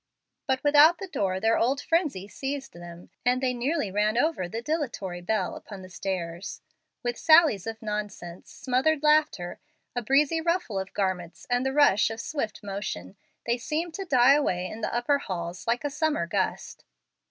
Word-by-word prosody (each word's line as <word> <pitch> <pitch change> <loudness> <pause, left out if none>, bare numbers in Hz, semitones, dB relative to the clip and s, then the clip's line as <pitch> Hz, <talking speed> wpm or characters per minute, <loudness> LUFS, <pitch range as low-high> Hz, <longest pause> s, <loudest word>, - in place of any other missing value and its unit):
But 265 0 0
without 300 +3 +6
the 390 - -6
door 190 - -1
their 225 +3 +2
old 265 +4 +2
frenzy 300 - 0
seized 270 +5 -5
them, 175 0 -11
and 250 +1 +2
they 255 -1 0
nearly 250 - -1
ran 210 +3 +1
over 245 - +1
the 225 - -4
dilatory 240 - -3
Bel 190 0 -1
upon 195 -3 -10
the 185 - -12
stairs. 180 -1 -4 0.4
With 240 0 -2
sallies 315 - +5
of 225 0 -6
nonsense, 205 -5 -5
smothered 280 +4 0
laughter, 300 - +2 0.4
a 245 - 0
breezy 285 +7 +2
rustle 335 - 0
of 190 0 -7
garments, 185 -4 -2
and 245 +1 +2
the 265 - 0
rush 265 -8 +4
of 225 0 -6
swift 225 -6 -4
motion, 195 - -5 0.3
they 235 +1 0
seemed 320 +6 -3
to 390 +3 -5
die 260 -4 +5
away 185 -12 +1
in 215 +4 -7
the - - -2
upper 245 +4 +1
halls 175 -5 -5
like 235 +3 +1
a 290 - -2
summer 305 - 0
gust. 190 +2 -3
235 Hz, 175 wpm, -27 LUFS, 190-290 Hz, 0.4 s, without